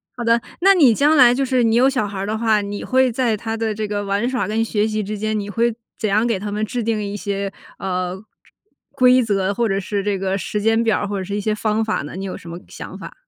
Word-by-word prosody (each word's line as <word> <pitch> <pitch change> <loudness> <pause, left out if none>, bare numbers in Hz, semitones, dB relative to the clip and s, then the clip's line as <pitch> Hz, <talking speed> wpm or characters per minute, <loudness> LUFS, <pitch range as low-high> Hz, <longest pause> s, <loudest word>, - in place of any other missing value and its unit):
好 240 - -5
的， 230 0 +3 0.2
那 390 +1 +7
你 280 -11 +5
将 295 +6 +3
来 250 -4 +7
就 270 +1 0
是 255 -1 +2
你 225 -1 +3
有 255 +3 +5
小 250 -6 0
孩 200 - -7
儿 195 - -2
的 215 +2 -2
话， 220 -2 +2
你 200 0 -5
会 260 -1 +2
在 230 -3 0
他 225 +2 -4
的 225 -1 -1
这 215 0 -3
个 205 0 -2
玩 200 +3 0
耍 250 -6 -1
跟 225 +1 0
学 215 -1 0
习 215 0 -2
之 210 +2 -4
间， 215 +1 -1
你 205 - -5
会 230 +3 0 0.3
怎 215 - 0
样 215 +3 +2
给 230 -5 0
他 205 +1 -5
们 210 +1 -1
制 240 +3 -3
定 220 -1 -1
一 200 0 -4
些， 200 -1 -3 0.3
呃 185 0 -3 0.7
规 255 -1 +5
则， 200 -3 0
或 230 0 0
者 195 - 0
是 200 +1 -2
这 205 -1 0
个 190 0 -1
时 210 - -3
间 225 +2 +2
表 220 -2 +2
儿， 205 - -2
或 200 -1 -3
者 - - -3
是 200 +2 -4
一 - - -1
些 215 +1 0
方 215 +1 0
法 220 - -1
呢？ 145 +4 -8
你 195 +1 -5
有 190 - -5
什 170 - -11
么 170 - -6
想 - - -9
法？ - - -9
215 Hz, 300 characters per minute, -20 LUFS, 200-235 Hz, 0.7 s, 那